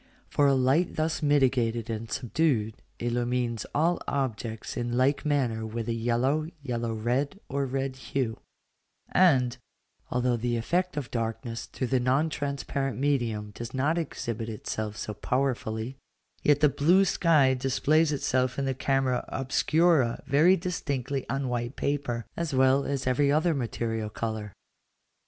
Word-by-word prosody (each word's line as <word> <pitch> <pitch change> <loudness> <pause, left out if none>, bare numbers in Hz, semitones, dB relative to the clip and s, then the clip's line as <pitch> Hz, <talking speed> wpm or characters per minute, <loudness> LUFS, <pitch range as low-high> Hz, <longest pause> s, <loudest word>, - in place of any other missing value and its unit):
For 145 - +4
a 135 - +4
light 135 +7 +2
thus 155 +1 -1
mitigated 125 -6 +2
and 115 -1 -4
subdued 125 -4 0 0.2
illumines 120 -1 -1
all 165 +3 +2
objects 115 -5 -3
in 120 0 -2
like 135 +4 +2
manner 125 -7 +1
with 110 +1 -4
a 115 - 0
yellow, 120 +7 +1 0.2
yellow 120 -4 -2
red, 125 - -1
or 140 0 -1
red 135 0 -2
hue; 120 -1 -2 0.7
and, 130 -9 +4 0.5
although 125 -1 +1
the 120 +1 -1
effect 175 +7 -1
of 140 -5 -4
darkness 115 0 -3
through 130 - -3
the 130 +1 +1
non 130 +6 +2
transparent 140 -2 -2
medium 120 -7 0
does 115 +4 -7
not 150 +6 +1
exhibit 115 -7 -4
itself 110 -1 -4
so 105 - -4
powerfully, 125 +1 -2 0.4
yet 145 0 +3
the 150 - +7
blue 175 +8 +4
sky 155 -8 +4
displays 145 +4 +2
itself 130 -3 0
in 140 - 0
the 135 - 0
camera 135 -1 0
obscura 135 0 +2
very 165 +7 +5
distinctly 140 -6 -3
on 135 -1 -1
white 120 +1 -2
paper, 135 -5 -2
as 165 -5 -2
well 130 +1 +4
as 140 -2 -2
every 140 +3 +2
other 160 +3 +3
material 115 -4 -2
colour. 110 -1 -4
130 Hz, 140 wpm, -28 LUFS, 115-145 Hz, 0.7 s, the